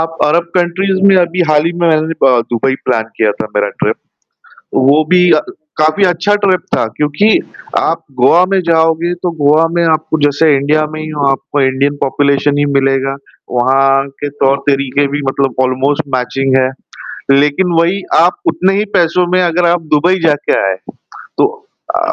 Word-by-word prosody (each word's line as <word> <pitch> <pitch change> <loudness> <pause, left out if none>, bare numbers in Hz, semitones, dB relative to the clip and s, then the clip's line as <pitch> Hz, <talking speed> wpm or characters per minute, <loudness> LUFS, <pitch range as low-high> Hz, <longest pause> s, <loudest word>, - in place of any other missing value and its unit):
आप 165 0 -3
अरब 165 +3 +2
कंट्रीज़ 185 +2 0
में 195 - +5
अभी 180 0 0
हाल 150 0 +3
ही 170 - -1
में 175 -1 0
मैंने 160 0 0
ब 135 - +5 0.2
दुबई 120 +3 0
प्लान 115 -3 0
किया 110 -2 +2
था 110 - -2
मेरा 105 0 +1
ट्रिप, - - 0 0.8
वो 145 +4 +3
भी 180 -1 +4
अ, 155 - +3 0.4
काफ़ी 155 +6 +2
अच्छा 185 +3 +1
ट्रिप 185 -3 +2 0.2
था - - 0
क्योंकि, 150 +8 +1 0.5
आप 165 0 -1 0.2
गोआ 165 +8 +5
में 195 - +2
जाओगे, 165 +1 +1
तो 175 0 -4
गोआ 155 +3 +4
में 170 - +2
आपको 160 -1 0
जैसे 145 +1 +3
इंडिया 150 +3 +1
में 155 - -6
ही 155 - -6
हो, 145 -2 -2
आपको 140 +1 -2
इंडियन 135 +2 0
पॉपुलेशन 140 +1 +1
ही 145 - +2
मिलेगा, 135 0 0 0.4
वहाँ 135 +2 +2
के 145 - -3 0.2
तौर-तरीके 140 0 0
भी 145 - -2
मतलब 135 -2 -2
ऑलमोस्ट 135 +4 -1
मैचिंग 130 +1 -1
है। 130 - +1 0.6
लेकिन 150 +6 +2
वही 180 +4 0
आप - - +3
उतने 195 - +1
ही 210 - 0
पैसों 175 +1 +2
में 185 - +2
अगर 175 0 +1
आप 170 0 +1
दुबई 175 +5 +2
जा 160 -2 +3
के - - +1 0.2
आए, 95 - -1 0.6
तो - - +4 0.5
अ, - - 0
155 Hz, 175 wpm, -13 LUFS, 135-175 Hz, 0.8 s, में